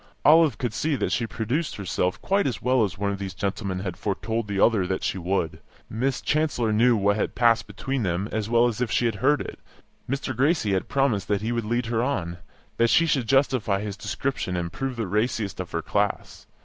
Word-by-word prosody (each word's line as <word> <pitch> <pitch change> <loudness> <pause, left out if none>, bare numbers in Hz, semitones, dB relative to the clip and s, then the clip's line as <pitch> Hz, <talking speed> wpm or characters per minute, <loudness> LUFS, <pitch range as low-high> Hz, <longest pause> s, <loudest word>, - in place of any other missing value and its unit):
Olive 155 -4 +6
could 120 -4 -2
see 145 +8 0
that - - -1
she 115 - 0
produced 120 +9 -2
herself 90 -2 -1
quite 200 -2 +2
as 125 - -2
well 125 -2 +2
as 100 -2 -2
one 100 0 -1
of 100 - -4
these 95 -1 -5
gentlemen 95 -2 -3
had 95 -3 -4
foretold 110 +2 -2
the 100 -1 -2
other 100 -4 +3
that 95 - -2
she 95 - -1
would. 90 -2 -1 0.3
Miss 125 +4 -1
Chancellor 140 -8 +1
knew 115 +2 +4
what 100 +1 +2
had - - -2
passed 115 -1 +3
between 135 -1 -3
them 95 0 -1
as 110 -1 -2
well 120 0 +4
as 120 -1 -1
if 125 - 0
she 120 - +1
had 115 - +1
heard 145 +3 +3
it; - - -7 0.5
Mr. 135 -1 -2
Gracie 135 - +2
had 95 - -1
promised 135 -8 +1
that 105 0 0
he 115 - -1
would 115 -2 -1
lead 120 +2 0
her 115 0 0
on, 85 -10 -2 0.4
that 115 0 +3
she 165 - +5
should 135 -7 0
justify 130 -6 +2
his 105 -2 -4
description 105 -2 -3
and 85 0 -3
prove 135 +2 -3
the 115 -2 -2
raciest 105 0 -1
of 90 - -4
her 85 -1 -2
class. 100 0 -2
110 Hz, 220 wpm, -25 LUFS, 100-130 Hz, 0.5 s, Olive